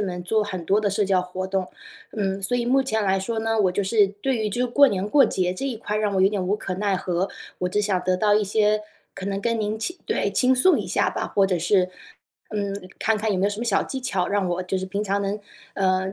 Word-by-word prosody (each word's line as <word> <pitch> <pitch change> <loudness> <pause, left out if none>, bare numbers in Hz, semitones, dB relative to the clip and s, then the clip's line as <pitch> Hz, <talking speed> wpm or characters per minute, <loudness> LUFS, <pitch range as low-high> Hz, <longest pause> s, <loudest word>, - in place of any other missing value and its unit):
们 180 -3 -3
做 215 +4 +1
很 185 -4 -5
多 200 +4 +2
的 210 - +1
社 200 +1 +1
交 190 -1 +2
活 180 +1 -5
动。 190 -1 -1 0.5
嗯， 195 -2 -2
所 245 +6 +1
以 240 - 0
目 265 +3 +4
前 220 -4 0
来 195 -1 +2
说 220 +3 -2
呢， 225 0 0
我 185 - +2
就 200 - 0
是 205 +1 +4
对 205 +7 -2
于 215 -2 -1
这 245 +4 -1
过 280 +4 +5
年 200 -4 -1
过 275 +5 +5
节 180 -1 0
这 185 +9 -4
一 250 -4 -3
块 210 -1 -3
让 210 -2 0
我 190 - +2
有 190 - +6
点 195 -3 -2
无 200 - +2
可 195 -3 -4
奈 200 +1 0
何， 180 0 -1 0.3
我 180 - -1
只 210 - 0
想 195 -3 +1
得 185 0 +2
到 205 +2 +2
一 210 - +2
些 210 +1 +2 0.3
可 195 0 -7
能 195 0 -2
跟 230 0 0
您 210 +1 -1
倾 350 +11 -4
对， - - 0
倾 260 0 +3
诉 355 +9 +4
一 - - -4
下 - - +1
吧， - - -3
或 200 - +2
者 185 -2 +1
是 180 +2 +2 0.6
嗯， 200 -2 -3
看 220 0 +2
看 215 0 -1
有 185 - 0
没 195 - +2
有 - - +1
什 205 - -5
么 235 - -2
小 225 -5 +2
技 265 - -5
巧， 195 -8 -1
让 200 -2 0
我 175 +1 -1
就 185 +1 -2
是 185 - -2
平 200 +2 -3
常 200 0 0
能， 200 +1 -2 0.3
呃， 190 0 0
200 Hz, 290 characters per minute, -24 LUFS, 190-215 Hz, 0.6 s, 有